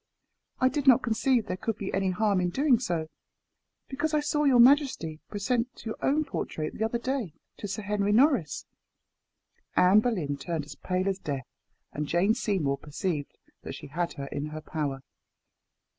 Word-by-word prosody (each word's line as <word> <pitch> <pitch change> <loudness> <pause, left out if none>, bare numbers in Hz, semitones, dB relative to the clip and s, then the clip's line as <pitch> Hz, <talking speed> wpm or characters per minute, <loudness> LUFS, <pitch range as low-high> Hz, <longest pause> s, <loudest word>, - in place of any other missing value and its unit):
I 255 - +4
did 285 +1 -1
not 260 0 +7
conceive 240 0 +2
there 185 - -3
could 225 +2 -3
be 200 - -5
any 195 0 +1
harm 200 0 +1
in 180 - +1
doing 265 +4 +3
so, 170 -10 -1 0.8
because 300 +3 -1
I - - +4
saw 295 0 0
your 265 -3 +5
majesty 245 - +4
present 235 +5 -2
your 220 - -3
own 305 +3 +2
portrait, 155 - -4
the 220 - -3
other 225 +2 0
day, 240 - -3 0.2
to 205 - -5
Sir 210 +2 -4
Henry 205 0 0
Norris." 240 - +3 1.1
Anne 185 +3 +6
Boleyn 180 -12 -1
turned 155 +1 -3
as - - -9
pale 185 +1 -2
as 195 -1 -1
death, 140 -6 -4 0.5
and 150 0 -3
Jane 180 +7 +3
Seymour 180 - 0
perceived 150 0 -4 0.2
that - - -7
she - - -9
had 170 +3 -2
her 140 - -6
in 140 +2 -4
her 155 +1 -7
power. 145 -3 -3
200 Hz, 175 wpm, -28 LUFS, 160-250 Hz, 1.1 s, not